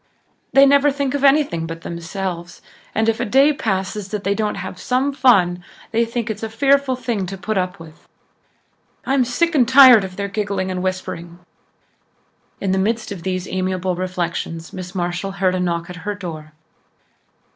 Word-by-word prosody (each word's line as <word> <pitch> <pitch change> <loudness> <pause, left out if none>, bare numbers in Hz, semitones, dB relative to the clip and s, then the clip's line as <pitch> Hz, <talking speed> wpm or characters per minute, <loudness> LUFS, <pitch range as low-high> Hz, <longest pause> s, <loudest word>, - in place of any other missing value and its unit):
"They 275 0 +7
never 280 +1 +5
think 280 -1 -2
of 285 -1 -2
anything 275 - +3
but 165 0 -7
themselves 170 +1 -6 0.3
and 220 +1 +1
if 225 0 +1
a - - 0
day 270 +6 +4
passes 195 -4 -2
that 210 -1 -4
they 200 - +1
don't 210 0 -1
have 185 -1 -7
'some 260 +7 0
fun' 185 -10 +3 0.3
they 230 +1 +2
think 230 0 -3
it's 215 -2 -4
a 225 - -3
fearful 275 +3 +2
thing 230 -6 -3
to 195 +2 -6
put 215 +3 -3
up 180 -1 -1
with. 160 -1 -14 1.0
I'm 270 -1 +2
sick 335 +8 0
and 255 -6 +3
tired 260 -4 +8
of 185 -1 -7
their 200 0 -3
giggling 200 -2 -2
and 180 -1 -3
whispering." 180 -2 -4 1.2
In 195 - -1
the 190 - +1
midst 220 +2 -1
of 190 -4 -6
these 185 0 -3
amiable 185 -1 -2
reflections 175 -2 -4
Miss 185 -1 -8
Marshall 180 +2 -2
heard 190 -2 +1
a 185 - -1
knock 170 -1 -1
at 180 -1 -9
her 205 +4 -4
door. 160 -6 -8
195 Hz, 180 wpm, -20 LUFS, 180-240 Hz, 1.2 s, tired